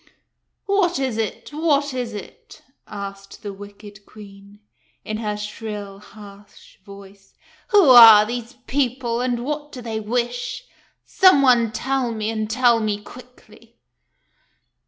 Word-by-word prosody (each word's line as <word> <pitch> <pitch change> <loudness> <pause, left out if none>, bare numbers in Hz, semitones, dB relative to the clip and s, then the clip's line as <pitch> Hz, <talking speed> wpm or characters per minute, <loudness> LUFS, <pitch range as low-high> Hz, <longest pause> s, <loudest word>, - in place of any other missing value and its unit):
" - - -55 0.2
What 395 -3 +1
is 265 -4 -2
it? 220 - -4
What 290 -3 0
is 245 -3 -4
it? 205 - -12
" - - -52
asked 195 -1 -9
the 205 -1 -6
wicked 205 +1 -13
Queen, 200 -1 -15 0.5
in 215 - -4
her 210 -2 -4
shrill, 210 -2 -7
harsh 205 -1 -16
voice. 200 -1 -15 0.2
" - - -31
Who 405 -6 +5
are 225 -4 +9
these 240 +1 -6
people, 250 -3 -2
and 245 -1 -2
what 295 +1 -5
do 255 - -9
they 225 -2 -5
wish? 240 - -3 0.4
Some 370 -8 +4
one 240 -4 +3
tell 260 0 -2
me, 215 0 -3
and 215 -1 -4
tell 235 0 +3
me 210 -2 -2
quickly." 230 -1 -17
225 Hz, 140 wpm, -21 LUFS, 210-250 Hz, 0.5 s, are